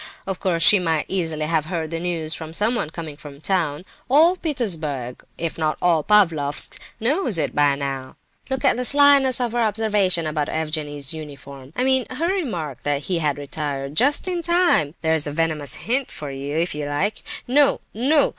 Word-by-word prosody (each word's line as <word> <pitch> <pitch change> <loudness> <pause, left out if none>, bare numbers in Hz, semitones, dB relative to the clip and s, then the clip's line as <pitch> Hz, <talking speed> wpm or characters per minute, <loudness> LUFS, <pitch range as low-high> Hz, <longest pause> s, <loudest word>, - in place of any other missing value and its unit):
Of 190 -1 -4
course 170 -3 +1
she 205 - +8
might 165 -4 0
easily 160 -5 -1
have 155 -1 0
heard 165 -2 -4
the 165 - -2
news 165 -2 0
from 160 0 -5
someone 215 -4 0
coming 160 -2 -7
from 145 -1 -12
town. 165 -2 -1 0.2
All 320 +7 +5
Petersburg, 165 - -3
if 165 0 -4
not 155 -1 0
all 170 -3 +2
Pavlofsk, 165 -9 +2 0.2
knows 250 - +1
it 150 -3 -1
by 145 -1 +3
now. 135 -2 -5 0.3
Look 265 +1 -2
at 260 - +3
the 250 - -1
slyness 280 -1 +5
of 245 -2 -1
her 240 - -1
observation 210 -6 +1
about 150 -1 -2
Evgenie's 150 -3 -1
uniform! 140 -3 -10
I 250 - 0
mean, 260 -1 +2
her 330 +8 -1
remark 175 - -4
that 145 0 -1
he 180 +1 -1
had 150 -3 0
retired 145 -1 -4
just 280 - +2
in 355 -2 -1
time! 340 - +2
There's 160 -2 +1
a - - -3
venomous 155 -2 -1
hint 255 +3 -1
for 145 -2 -7
you, 140 +2 -4
if 170 +2 0
you 150 -1 -4
like! 145 +9 -1 0.3
No, 280 +3 +3
no! 275 +6 +2
165 Hz, 185 wpm, -22 LUFS, 150-235 Hz, 0.3 s, she